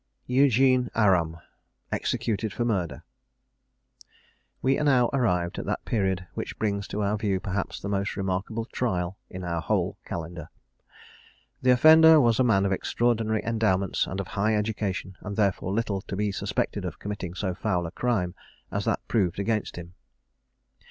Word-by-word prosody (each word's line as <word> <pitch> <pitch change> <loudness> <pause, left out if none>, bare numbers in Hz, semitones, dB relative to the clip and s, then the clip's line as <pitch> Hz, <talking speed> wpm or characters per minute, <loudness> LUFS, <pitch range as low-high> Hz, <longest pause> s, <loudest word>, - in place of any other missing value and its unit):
EUGENE 130 -1 +3
ARAM. 90 -7 +3 0.5
EXECUTED 110 -1 -1
FOR 120 - -2
MURDER. 95 -8 -1 1.6
We 135 +2 +2
are - - 0
now 130 -5 +4
arrived 90 -10 0
at - - -6
that - - -2
period 95 -5 0
which - - -5
brings 100 -2 -1
to 105 - -2
our 100 +1 +1
view 100 -3 0
perhaps 95 0 -3
the - - -6
most 100 0 -1
remarkable 95 +4 -2
trial 95 -7 -2
in 90 0 -7
our 85 -1 -2
whole - - -1
Calendar. 85 -1 -6 1.1
The 130 - +2
offender 160 +4 +8
was 115 -4 +3
a - - +5
man 100 -5 +3
of 100 - 0
extraordinary 110 +1 0
endowments 105 -5 +1
and 95 - -4
of 100 - -4
high 105 +2 +1
education, 105 -3 -2
and 105 -1 -6
therefore 100 -3 +1
little 100 -2 -1
to 100 - -6
be 105 +1 0
suspected - - -2
of - - -5
committing 100 -4 -5
so 95 -1 -2
foul 90 -2 -1
a 80 - -5
crime 100 -8 -1 0.4
as - - -2
that - - -1
proved 95 -7 +1
against 105 +1 -1
him. 85 0 -9
100 Hz, 160 wpm, -26 LUFS, 95-115 Hz, 1.6 s, offender